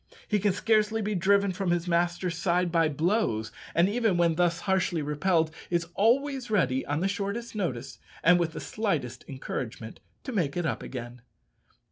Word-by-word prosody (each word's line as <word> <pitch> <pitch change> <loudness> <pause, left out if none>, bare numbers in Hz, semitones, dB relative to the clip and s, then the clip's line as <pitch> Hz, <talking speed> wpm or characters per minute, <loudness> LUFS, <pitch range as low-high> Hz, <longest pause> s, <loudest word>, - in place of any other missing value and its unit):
He 210 - +1
can 205 +1 +2
scarcely 215 +2 +2
be 210 +1 -1
driven 200 +1 +3
from 185 0 -2
his 175 0 0
master's 175 0 0
side 175 0 +1
by 165 -2 +3
blows; 150 - 0 0.2
and 170 +2 +5
even 220 -3 +1
when 170 -1 +3
thus 170 0 +1
harshly 185 -5 0
repelled, 155 +2 +1 0.2
is 170 -1 0
always 260 +4 +1
ready, 135 -11 +2
on 145 +2 -1
the 190 - +2
shortest 200 +4 -3
notice 135 - -3 0.2
and 175 +1 +6
with 165 -2 0
the - - -5
slightest 145 - -2
encouragement, 120 -4 -6 0.2
to 260 - -5
make 175 - -1
it 175 - -1
up 155 - -1
again. 120 -1 -7
175 Hz, 170 wpm, -28 LUFS, 155-200 Hz, 0.2 s, and